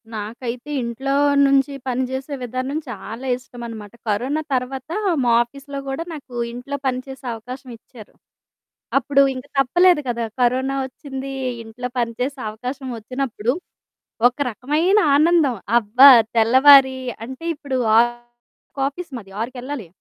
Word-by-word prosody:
నాకైతే 235 +5 -6
ఇంట్లో 240 +3 -3 0.3
నుంచి 275 +1 +3
పని 255 0 0
జేసే 265 +2 -4
విధానం 255 +4 -3
చాలా 225 +3 -7
ఇష్టమనమాట. 235 -5 -9 0.2
కరోన 255 +9 0
తర్వాత 260 +2 -3 0.3
మా 240 - +3
ఆఫీస్‌లో 275 +3 -9
గూడా 270 +4 -3
నాకింట్లో 245 -1 -5
పని 255 -1 0
చేసే 265 0 -10
అవకాశమిచ్చారు. 235 -1 -11 0.8
అప్పుడు 275 0 +3
ఇంక 255 +1 -7
తప్పలేదు 350 +5 +4
కదా 235 -1 -1 0.2
కరోనా 260 +2 +1
వచ్చింది, 270 +1 -7 0.3
ఇంట్లో 230 +3 -6
పని 235 -1 0
చేసే 270 +2 -2
అవకాశం 250 +5 -6
వచ్చినప్పుడు, 245 0 -2 0.8
ఒక 250 - -22
రకమైన 305 - +2 0.2
ఆనందం 310 -4 +3 0.2
అబ్బా! 240 +6 +7 0.3
తెల్లవారి 260 +3 +7 0.3
అంటే 260 +6 -9
ఇప్పుడు 280 -3 -4 0.2
6కి 240 +3 -3
ఆఫీస్ 335 +3 -9
మాది 195 -4 -11
ఆరుకెళ్ళాలి. 250 -1 -5
255 Hz, 115 wpm, -21 LUFS, 240-275 Hz, 0.8 s, అబ్బా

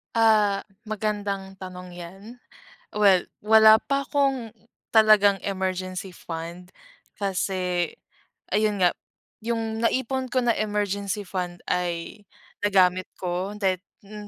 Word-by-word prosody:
Ah, 215 -3 +3 0.2
magandang 205 -2 -3
tanong 180 -1 -8
yan. 175 +3 -10 0.7
Well, 200 -3 +4 0.2
wala 220 +1 +7
pa 275 0 -1
akong, 270 -6 0 0.4
talagang 210 -3 +6
emergency 185 -1 -3
fund, 170 +2 -7 0.5
kasi, 185 -3 -1 0.6
ayun 210 0 +2
nga, 175 - +4 0.5
yung 225 -1 -2
naipon 260 +2 0
ko 255 -1 +1
na 235 - +4
emergency 205 -1 -2
fund, 180 -2 -4
ay 175 +3 -2 0.4
nagamit 185 -3 +3
ko 185 +3 -3
dahil 190 -3 0 0.2
mm, 210 0 -9
200 Hz, 105 wpm, -25 LUFS, 185-215 Hz, 0.7 s, wala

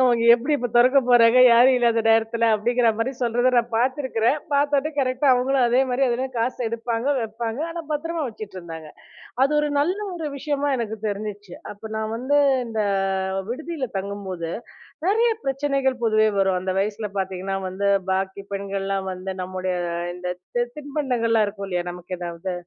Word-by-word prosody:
அவங்க 240 -2 +3
எப்பிடி 260 +6 0
இப்போ 245 -1 -3
திறக்கப் 255 +1 +5
போறாங்க, 240 0 +6
யாரும் 250 +3 +6
இல்லாத 235 -1 +2
நேரத்தில?" 225 +1 +3
அப்பிடிங்கிறமாரி 230 +2 +1
சொல்றத 245 +2 +2
நான் 235 -1 +1
பார்த்திக்கிறேன். 260 +1 +1 0.2
பார்த்தோன்னே 285 +1 +2
கரெக்ட்டா 260 +1 +1
அவுங்களும் 255 +1 +2
அதேமாரி 255 +2 +2
எதுன்னா 255 +2 -1
காசு 250 +2 -1
எடுப்பாங்க, 230 +2 -3
வைப்பாங்க. 225 +3 -4
ஆனா, 335 0 -5
பத்திரமா 330 +2 -2
வச்சுட்ருந்தாங்க. 170 -8 -9 0.6
அது 275 - +2
ஒரு 295 - 0
நல்ல 355 +7 +1 0.2
ஒரு 320 -3 -4
விஷயமா 290 0 -1
எனக்கு 220 -2 -3
தெரிஞ்சுச்சு. 205 -2 -5 0.2
அப்ப 215 +2 -10
நான் 220 0 -3
வந்து, 280 +4 +2 0.3
இந்த 220 -1 -2 0.7
விடுதியில 310 0 -4
தங்கும்போது 190 -4 -5 0.6
நிறைய 455 +4 +3
பிரச்சனைகள் 275 -1 0
பொதுவே 215 -1 +3
வரும். 190 -1 +2
அந்த 185 +1 -2
வயசில 210 +1 -2
பார்த்தீங்கன்னா 190 0 -3
வந்து 200 +2 -2 0.2
பாக்கி 190 +1 -2
பெண்கள்லாம் 195 -1 -3
வந்து 185 +1 -6
நம்முடைய 185 0 -3 0.4
இந்த 180 0 -6 0.3
தி 240 - +3
தின்பண்டங்கள்லாம் 250 -7 0
இருக்கும் 200 -1 -6
இல்லயா! 180 -1 -1
நமக்கு 180 +1 -7
எதாவது 175 +1 -5
230 Hz, 145 wpm, -23 LUFS, 200-265 Hz, 0.7 s, போறாங்க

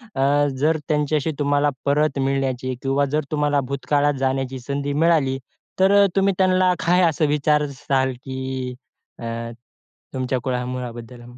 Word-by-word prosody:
अ, 145 +2 +3
जर 155 +3 +2
त्यांच्याशी 150 0 0
तुम्हाला 145 0 +2 0.2
परत 145 0 +1
मिळण्याची 135 -1 -1
किंवा 140 +1 +1
जर 155 0 +1
तुम्हाला 145 -1 +1
भूतकाळात 145 +1 +1
जाण्याची 135 -1 -1
संधी 140 +2 -3
मिळाली, 150 -4 +2 0.4
तर 190 +1 +5
अ, - - +6
तुम्ही 195 0 +3
त्यांना 185 -1 +3
काय 180 +2 +4
असं 155 0 0
विचाराल? 140 -3 +1
की 130 -1 -4 0.4
अ, 115 - -7 0.9
तुमच्या 130 0 -1
कुळामुळाबद्दल? 125 -2 -4
140 Hz, 125 wpm, -22 LUFS, 130-150 Hz, 0.9 s, अ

